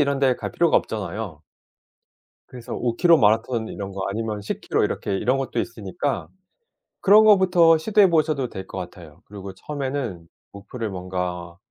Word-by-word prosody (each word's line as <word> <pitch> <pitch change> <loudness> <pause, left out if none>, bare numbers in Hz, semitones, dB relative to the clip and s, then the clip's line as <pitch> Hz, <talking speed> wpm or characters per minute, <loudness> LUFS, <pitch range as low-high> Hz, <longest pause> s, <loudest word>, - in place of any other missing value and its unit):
이런 140 -1 +1
데 130 -2 +2
갈 - - -6
필요가 170 -2 +3
없잖아요. 100 -5 -4 1.1
그래서 125 -2 -8
5km 150 +8 +3
마라톤 110 +1 +1
이런 100 -1 -6
거 95 0 -5
아니면 110 0 -3
10km 100 - -1
이렇게 100 - -2
이런 130 +6 +1
것도 135 - -3
있으니까 115 +4 -4 0.7
그런 210 +2 +7
거부터 180 -5 +5
시도해 205 +3 +4
보셔도 155 -6 +1
될 95 0 -8
것 - - -8
같아요. 85 -4 -9
그리고 100 -2 -9
처음에는 130 - -5 0.2
목표를 105 +3 -6
뭔가 90 -2 -5
115 Hz, 340 characters per minute, -23 LUFS, 95-145 Hz, 1.1 s, 그런